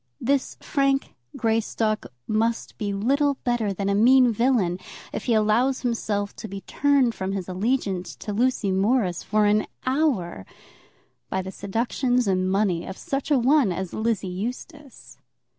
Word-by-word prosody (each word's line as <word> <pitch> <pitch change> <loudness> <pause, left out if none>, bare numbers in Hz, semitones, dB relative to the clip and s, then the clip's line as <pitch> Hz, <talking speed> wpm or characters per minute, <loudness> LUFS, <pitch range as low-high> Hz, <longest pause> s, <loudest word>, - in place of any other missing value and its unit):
This 275 +2 0
Frank 275 -1 0 0.2
Greystock 220 -1 0 0.2
must 225 +2 -1
be 205 -2 -1
little 275 +8 +1
better 240 -4 0
than 195 +1 -3
a 200 - +2
mean 245 +3 +5
villain, 215 -7 +1 0.3
if - - -4
he 235 - +2
allows 225 +5 +2
himself 210 -4 -2
to - - -6
be 195 -1 -7
turned 275 -2 +2
from 190 -2 -3
his 190 -3 -4
allegiance 190 -1 -1
to 210 - -6
Lucy 230 -3 +1
Morris 195 -2 +1
for 215 0 +1
an 210 +1 +2 0.2
hour 255 - 0 0.9
by 190 0 -1
the 190 - -6
seductions 245 +5 0
and 185 -1 +1
money 190 -4 +1
of 190 - -7
such 280 -4 -3
a 290 - +4
one 260 -3 +3
as 185 0 -4
Lizzie 220 -3 -1
Eustace. 250 - -7
220 Hz, 150 wpm, -24 LUFS, 195-255 Hz, 0.9 s, mean